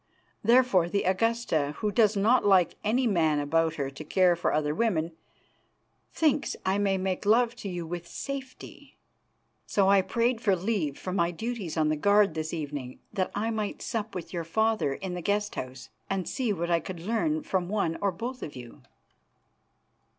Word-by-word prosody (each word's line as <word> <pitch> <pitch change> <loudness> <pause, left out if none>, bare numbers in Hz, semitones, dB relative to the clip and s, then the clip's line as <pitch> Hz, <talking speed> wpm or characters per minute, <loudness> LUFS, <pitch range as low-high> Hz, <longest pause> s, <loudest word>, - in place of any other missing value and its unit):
Therefore, 235 -8 +4
the 200 +2 0
Augusta, 185 -7 0
who 210 -1 -1
does 215 -2 +3
not 230 +5 +4
like 190 -4 +4
any 245 +5 +2
man 165 -8 +2
about 160 +2 +1
her 140 -3 -3
to 140 - -9
care 180 +3 +3
for 170 - 0
other 150 -1 0
women, 170 -4 0 1.0
thinks 305 -3 +1
I 190 +2 +1
may 195 -1 +2
make 185 -1 -2
love 230 +3 +3
to 200 - -6
you 175 -2 -4
with 175 +1 -6
safety. 270 +3 -8 0.7
So 195 -2 +3
I 200 -1 +6
prayed 235 +4 0
for 200 -4 +3
leave 180 -7 -1
from 185 0 -4
my 170 -1 +2
duties 205 -2 -4
on 155 -1 +2
the 155 - +1
guard 200 +3 +4
this 155 0 -3
evening 145 -5 -5 0.2
that 185 -1 0
I 220 +3 -1
might 215 -2 -3
sup 220 -3 -3
with 180 0 -6
your 170 -2 -2
father 215 -4 +1
in 190 -2 -5
the 180 - -4
guest 205 +3 0
house, 130 0 -7 0.2
and 190 -3 -2
see 250 -5 -1
what 170 -3 -2
I 170 - +4
could 170 +1 -7
learn 255 - 0
from 185 -9 -1
one 200 -6 0
or 200 -1 +2
both 245 +8 -6
of 150 - -7
you." 120 -2 -11
190 Hz, 180 wpm, -28 LUFS, 165-220 Hz, 1.0 s, I